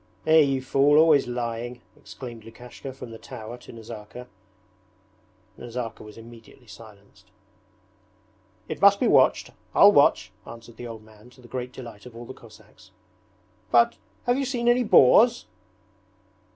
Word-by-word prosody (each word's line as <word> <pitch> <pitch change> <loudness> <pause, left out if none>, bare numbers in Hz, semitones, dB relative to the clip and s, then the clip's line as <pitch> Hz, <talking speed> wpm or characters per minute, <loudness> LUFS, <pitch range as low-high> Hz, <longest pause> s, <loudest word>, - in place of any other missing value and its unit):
'Eh, 160 0 +5
you 135 -3 +1
fool, 140 +3 +3
always 155 -4 +4
lying!' 120 0 -5 0.2
exclaimed 115 +1 -11
Lukashka 120 +4 -11
from 125 -2 -11
the 115 - -11
tower 115 0 -9
to - - -14
Nazarka. 115 +1 -11 1.3
Nazarka 120 -1 -7
was 105 0 -13
immediately 115 +2 -15
silenced. 110 -3 -17 1.4
'It - - -7
must - - +5
be - - +1
watched. - - +3 0.2
I'll - - +7
watch,' - - +3 0.2
answered 115 0 -13
the 120 - -8
old 110 -2 -10
man 110 +2 -19
to 125 +1 -20
the 120 - -16
great 125 0 -6
delight 120 -3 -11
of 120 - -15
all 120 +1 -10
the 130 - -10
Cossacks. 110 -3 -19 0.8
'But 120 -1 +3 0.3
have 245 +2 0
you 275 - -1
seen 245 -2 -3
any 245 +1 +3
boars?' 220 - +4
120 Hz, 145 wpm, -24 LUFS, 115-135 Hz, 1.4 s, I'll